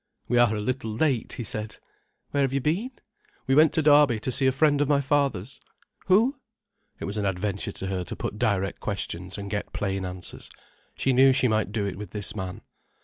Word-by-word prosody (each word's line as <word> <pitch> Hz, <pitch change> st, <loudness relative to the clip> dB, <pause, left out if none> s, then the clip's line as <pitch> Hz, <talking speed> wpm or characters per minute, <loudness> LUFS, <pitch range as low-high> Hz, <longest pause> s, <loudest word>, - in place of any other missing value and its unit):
"We 120 Hz, -, +2 dB
are 120 Hz, -2 st, +4 dB
a -, -, -2 dB
little 125 Hz, 0 st, -2 dB
late," 125 Hz, +1 st, 0 dB
he 120 Hz, -, -5 dB
said. 110 Hz, -1 st, -5 dB, 0.6 s
"Where 140 Hz, -, +1 dB
have 135 Hz, -1 st, +1 dB
you 140 Hz, -, +2 dB
been?" 170 Hz, -, 0 dB, 0.6 s
"We -, -, +1 dB
went 155 Hz, +2 st, +6 dB
to 160 Hz, -, +1 dB
Derby 145 Hz, -6 st, +5 dB
to 130 Hz, -, -2 dB
see 135 Hz, +2 st, +1 dB
a -, -, +5 dB
friend 145 Hz, +1 st, +3 dB
of 145 Hz, -, +1 dB
my 145 Hz, -1 st, +4 dB
father's." 135 Hz, -5 st, 0 dB, 0.5 s
"Who?" 230 Hz, +9 st, +3 dB, 0.6 s
It -, -, -4 dB
was 100 Hz, +2 st, -4 dB
an 105 Hz, -, -1 dB
adventure 100 Hz, +2 st, -2 dB
to -, -, -6 dB
her 95 Hz, -1 st, -2 dB
to -, -, -6 dB
put 105 Hz, -, -5 dB
direct 95 Hz, -2 st, 0 dB
questions 90 Hz, -2 st, -4 dB
and 100 Hz, -1 st, -6 dB
get 105 Hz, -, -3 dB
plain 95 Hz, -1 st, -2 dB
answers. 90 Hz, -1 st, -7 dB, 0.5 s
She 135 Hz, -, +1 dB
knew 135 Hz, +1 st, +6 dB
she 130 Hz, -1 st, +3 dB
might 110 Hz, -3 st, 0 dB
do 105 Hz, -2 st, -1 dB
it 100 Hz, -1 st, -4 dB
with 105 Hz, -4 st, -8 dB
this 105 Hz, -1 st, -1 dB
man. 95 Hz, -3 st, -5 dB
110 Hz, 210 wpm, -26 LUFS, 100-140 Hz, 0.6 s, went